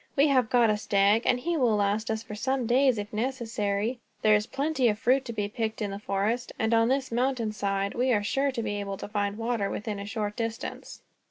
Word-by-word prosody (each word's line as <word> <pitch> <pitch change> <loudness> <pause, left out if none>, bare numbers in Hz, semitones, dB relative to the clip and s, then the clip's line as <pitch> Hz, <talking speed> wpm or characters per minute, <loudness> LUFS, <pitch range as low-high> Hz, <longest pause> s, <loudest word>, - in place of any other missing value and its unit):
"We 285 +2 +4
have 255 -5 +3
got 235 -3 +4
a 210 - 0
stag, 205 +2 +2
and 250 - +3
he 340 +6 -1
will 240 -6 +3
last 205 +2 0
us 220 0 -2
for 215 - -9
some 260 +4 -1
days, 255 +1 +3
if 205 +1 -5
necessary. 225 -1 -1 0.2
There 215 - +6
is 210 +1 +2
plenty 275 -2 0
of 210 -2 +1
fruit 260 +4 +2
to 235 - -4
be 210 -3 -2
picked 220 +1 -3
in 205 -2 -2
the 200 - -5
forest, 210 +5 -1
and 220 +1 +1
on 230 0 +4
this 265 0 0
mountain 240 -2 0
side 200 -1 -1
we 255 +2 +1
are 205 -3 +2
sure 275 +6 +1
to 235 -3 -3
be 205 -1 -2
able 200 -1 -4
to - - -6
find 205 -1 -2
water, 225 -3 -1
within 210 -1 -4
a 200 - -6
short 210 0 -3
distance." 230 -1 -5
220 Hz, 235 wpm, -27 LUFS, 205-250 Hz, 0.2 s, There